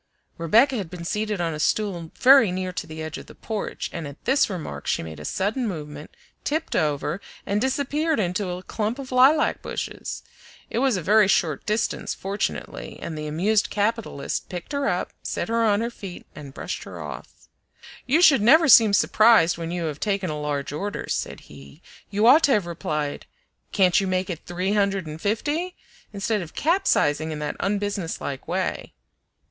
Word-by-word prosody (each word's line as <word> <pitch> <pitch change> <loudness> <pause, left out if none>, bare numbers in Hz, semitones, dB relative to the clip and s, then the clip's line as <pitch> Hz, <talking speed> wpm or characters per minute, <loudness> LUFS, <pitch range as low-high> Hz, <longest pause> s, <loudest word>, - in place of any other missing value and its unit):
Rebecca 230 - +4
had 195 -6 -4
been 175 -1 -8
seated 210 +2 -2
on 165 -2 -1
a 150 - -6
stool 175 -1 0
very 260 -6 +6
near 185 0 -3
to - - -5
the 155 0 -7
edge 155 0 -5
of - - -12
the - - -13
porch, 220 -2 -4
and 160 - -5
at 140 +1 -12
this 270 0 +3
remark 180 -5 -6
she - - 0
made 80 -2 -8
a 75 - -8
sudden 220 - -1
movement, 150 -5 -6 0.3
tipped 315 +2 -2
over, 150 +4 0 0.2
and 205 +1 0
disappeared 285 +3 0
into 185 0 -1
a 180 +1 -5
clump 215 +5 -2
of 270 -2 -8
lilac 265 +5 +4
bushes. - - -5 0.5
It 230 - 0
was 260 -5 +2
a 180 - -4
very 210 +3 +5
short 165 -5 +1
distance, 215 +1 -1
fortunately, 200 +2 -4
and 165 - -5
the 150 0 -5
amused 200 +8 +1
capitalist 210 -7 -2
picked 180 - -7
her 280 -1 -1
up, - - -2
set - - -3
her 230 0 +2
on 210 -1 +3
her 235 +1 -2
feet, 195 -6 -9
and 140 -2 -10
brushed - - -5
her - - -9
off. - - -9 0.6
"You 310 +7 +4
should 275 - +7
never 310 +9 +6
seem 225 -5 +8
surprised 210 -5 +5
when 165 -1 -4
you 175 0 -3
have 150 -2 -4
taken 195 -5 -1
a 150 0 -4
large 145 -1 -3
order," 200 +7 -4
said - - -3
he; 70 0 -14 0.3
"you 210 +2 +1
ought 270 +7 +8
to 275 - +3
have 205 -4 +2
replied 150 -3 -3 0.4
'Can't 185 -1 +4
you 195 - -2
make 185 0 -1
it 165 - -8
three 180 +3 -1
hundred 200 -3 +1
and 155 +1 -8
fifty?' 295 - -1 0.4
instead 210 +1 -1
of 165 -3 -9
capsizing 160 - +2
in 155 - -4
that 150 0 -3
unbusinesslike 200 -8 -3
way." - - -2
200 Hz, 185 wpm, -24 LUFS, 165-230 Hz, 0.6 s, seem